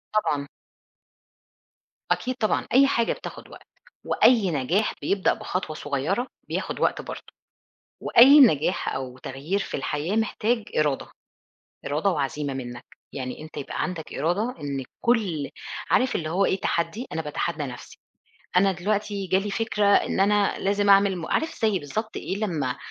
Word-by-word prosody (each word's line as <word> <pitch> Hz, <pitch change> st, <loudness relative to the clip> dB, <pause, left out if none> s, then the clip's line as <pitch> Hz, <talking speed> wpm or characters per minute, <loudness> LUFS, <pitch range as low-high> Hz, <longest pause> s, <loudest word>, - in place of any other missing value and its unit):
طبعًا. 145 Hz, -9 st, +1 dB, 1.6 s
أكيد 255 Hz, 0 st, 0 dB
طبعًا، 215 Hz, -4 st, 0 dB
أي 275 Hz, +2 st, +7 dB
حاجة 235 Hz, -4 st, +1 dB
بتاخد -, -, -9 dB
وقت. -, -, -14 dB, 0.4 s
وأي 220 Hz, -7 st, +4 dB
نجاح 165 Hz, +9 st, 0 dB
بيبدأ 195 Hz, -1 st, +2 dB
بخطوة 180 Hz, -4 st, -4 dB
صغيّرة 150 Hz, -, -1 dB, 0.2 s
بياخد -, -, -3 dB
وقت -, -, +1 dB
برضو. -, -, -9 dB, 0.7 s
وأي 275 Hz, +5 st, +8 dB
نجاح 180 Hz, -, +4 dB
أو 130 Hz, -1 st, -5 dB
تغيير 140 Hz, +10 st, -3 dB
في -, -, -4 dB
الحياة 150 Hz, +7 st, -2 dB
محتاج 225 Hz, +1 st, 0 dB
إرادة، 150 Hz, -3 st, +1 dB, 0.8 s
إرادة 150 Hz, +7 st, +1 dB
وعزيمة 145 Hz, -3 st, -2 dB
منّك. 120 Hz, -2 st, -7 dB, 0.3 s
يعني 130 Hz, +1 st, -5 dB
أنت 155 Hz, 0 st, -10 dB
يبقى 140 Hz, -, -4 dB
عندك 175 Hz, -4 st, -5 dB
إرادة 190 Hz, -, -1 dB
إن 140 Hz, -2 st, -3 dB, 0.2 s
كل 200 Hz, -, +1 dB, 0.4 s
عارف 255 Hz, 0 st, +3 dB
اللي 155 Hz, -2 st, -2 dB
هو 190 Hz, +4 st, +2 dB
إيه 190 Hz, -, 0 dB
تحدّي 170 Hz, +11 st, -1 dB
أنا 160 Hz, -, -2 dB
باتحدى 150 Hz, 0 st, -3 dB
نَفسي. 125 Hz, -3 st, -8 dB, 0.6 s
أنا 195 Hz, +1 st, +5 dB
دلوقتي 200 Hz, +2 st, -2 dB
جا 190 Hz, +1 st, +3 dB
لي 205 Hz, +1 st, -3 dB
فكرة 210 Hz, -1 st, 0 dB
إن 200 Hz, -1 st, +3 dB
أنا 205 Hz, 0 st, +3 dB
لازم 200 Hz, +1 st, +1 dB
أعمل 195 Hz, -1 st, +5 dB
م 165 Hz, -, -5 dB
عارف 320 Hz, -3 st, -1 dB
زي 215 Hz, -3 st, +3 dB
بالضبط 215 Hz, +9 st, -5 dB
إيه 190 Hz, -, -3 dB
لمّا 160 Hz, -12 st, -2 dB
185 Hz, 145 wpm, -25 LUFS, 145-210 Hz, 1.6 s, وأي